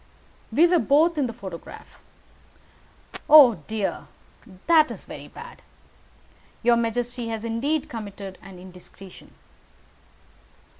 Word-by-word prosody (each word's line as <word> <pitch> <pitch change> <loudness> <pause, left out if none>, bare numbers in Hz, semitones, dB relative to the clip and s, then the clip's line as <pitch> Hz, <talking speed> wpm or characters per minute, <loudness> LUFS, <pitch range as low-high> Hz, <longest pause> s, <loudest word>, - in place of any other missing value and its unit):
"We 295 +9 +4
were 350 0 +3
both 310 +3 +2
in 270 - +1
the - - -5
photograph." 190 -7 -11 1.3
"Oh, 275 - +8
dear! 215 -3 -4 0.6
That 320 -2 +4
is - - -9
very - - -10
bad. 475 +1 -13 1.0
Your 240 0 +4
majesty 235 +1 -3
has 225 0 -5
indeed 280 +7 -2
committed 200 -6 -9
an 195 -2 -13
indiscretion." 185 +1 -15
235 Hz, 105 wpm, -24 LUFS, 200-300 Hz, 1.3 s, Oh